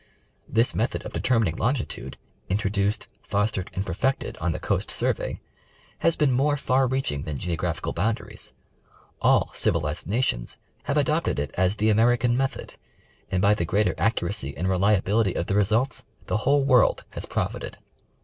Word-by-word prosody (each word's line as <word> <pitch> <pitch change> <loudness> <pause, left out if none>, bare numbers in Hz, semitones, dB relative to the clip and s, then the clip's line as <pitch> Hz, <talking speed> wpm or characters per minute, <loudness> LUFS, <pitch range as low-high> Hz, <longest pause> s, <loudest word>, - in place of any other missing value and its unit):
This 115 +2 +2
method 115 +4 -1
of - - -7
determining 115 -10 +1
longitude, 120 +1 -2 0.3
introduced, 100 +1 0
fostered 100 -2 -1
and 95 - -2
perfected 115 +10 -1
on 90 +1 -1
the - - -2
Coast - - -1
Survej^, - - -1 0.6
has 165 - +3
been 145 -3 +2
more 145 +4 +2
far 130 -1 +2
reaching 130 - -1
than 75 -1 -4
geographical 85 0 -2
boundaries. 110 +6 -2 0.7
All - - +3
civilized 75 -2 -1
nations 100 - -1 0.3
have - - 0
adopted - - +1
it 70 -1 -2
as 95 +2 +2
the 110 0 +2
"American 120 +2 +3
Method," 135 +1 -2 0.6
and 95 0 0
by 100 +1 +6
the 95 - -1
greater 100 +6 +1
ac 110 - +3
curacy 70 -9 -3
and 90 - -1
reliability 100 +1 +2
of 85 - -1
the - - -2
results 110 +6 +1 0.2
the - - 0
whole 140 +6 +3
world 130 -4 +4
has - - -6
profited. - - -3
105 Hz, 155 wpm, -25 LUFS, 90-120 Hz, 0.7 s, by